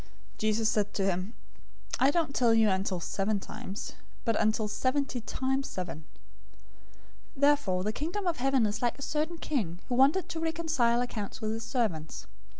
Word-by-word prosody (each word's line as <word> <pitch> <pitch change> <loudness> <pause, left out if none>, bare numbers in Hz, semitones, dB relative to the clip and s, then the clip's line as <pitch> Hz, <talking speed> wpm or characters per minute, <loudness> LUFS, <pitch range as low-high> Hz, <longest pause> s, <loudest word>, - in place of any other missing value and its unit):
018:022 - - -22 0.3
Jesus 215 +1 +2
said 210 -2 +1
to 195 - +1
him, 190 +3 -1 0.6
"I 265 - +5
don't 315 -2 +1
tell 235 -4 +4
you 220 -2 +5
until 190 -1 0
seven 200 +4 -1
times, 195 +3 -6 0.3
but, 230 -2 +2
until 215 0 +2
seventy 260 +3 0
times 265 +4 -1
seven. 165 -4 -5 1.3
018:023 270 - -11
Therefore 285 -11 +3
the 215 +2 -1
Kingdom 345 - -3
of 345 -2 +1
Heaven 265 -2 +3
is 210 0 -2
like 240 0 +1
a 280 - -7
certain 310 +4 -1
king, 220 - -2
who - - 0
wanted 280 +8 +4
to 325 - -3
reconcile 320 -8 +1
accounts 220 -5 -4
with 215 0 -1
his 225 +1 -3
servants. 210 - -2
235 Hz, 170 wpm, -30 LUFS, 205-275 Hz, 1.3 s, I